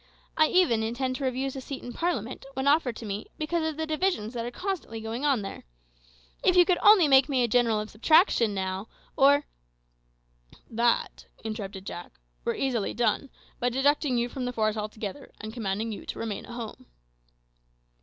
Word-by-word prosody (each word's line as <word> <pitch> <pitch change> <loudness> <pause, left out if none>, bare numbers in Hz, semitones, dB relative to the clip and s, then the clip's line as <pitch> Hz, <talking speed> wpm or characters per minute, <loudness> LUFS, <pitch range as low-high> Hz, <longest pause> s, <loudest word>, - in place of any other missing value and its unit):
I 310 -1 +5
even 335 -13 +3
intend 255 +3 -2
to 275 - -3
refuse 265 +1 -2
a 265 - -5
seat 270 +1 -7
in 245 - -7
parliament, 260 - -2
when 265 +1 -1
offered 280 -5 +3
to 230 - -8
me, 205 0 -4
because 320 +2 -1
of 310 - -7
the 320 - -1
divisions 310 - -1
that 235 -1 -3
are - - -2
constantly 360 - -4
going 225 +5 -4
on 270 -8 +2
there. 195 - -7 0.8
If 365 - +4
you 355 -1 +7
could 360 -1 +2
only 410 -6 +7
make 270 0 +6
me 260 -3 +2
a - - +2
general 230 -2 +3
of 215 0 -5
subtraction 235 - +4
now, 190 +2 -3 0.3
or 285 +2 +5 0.6
" - - -28
"That," 240 -1 +1 0.2
interrupted 200 -3 -5
Jack, 175 -3 -7 0.3
"were - - -1
easily 245 -6 -1
done, 235 +4 +1 0.3
by 245 - +1
deducting 270 +1 +2
you 240 0 +1
from 250 +1 -5
the 250 - -3
force 215 -2 +1
altogether, 215 +4 -6
and 215 0 -7
commanding 220 -1 -2
you 210 - -8
to - - -5
remain 220 -3 -4
at 240 - -9
home." 235 -3 -7
245 Hz, 185 wpm, -27 LUFS, 215-285 Hz, 0.8 s, you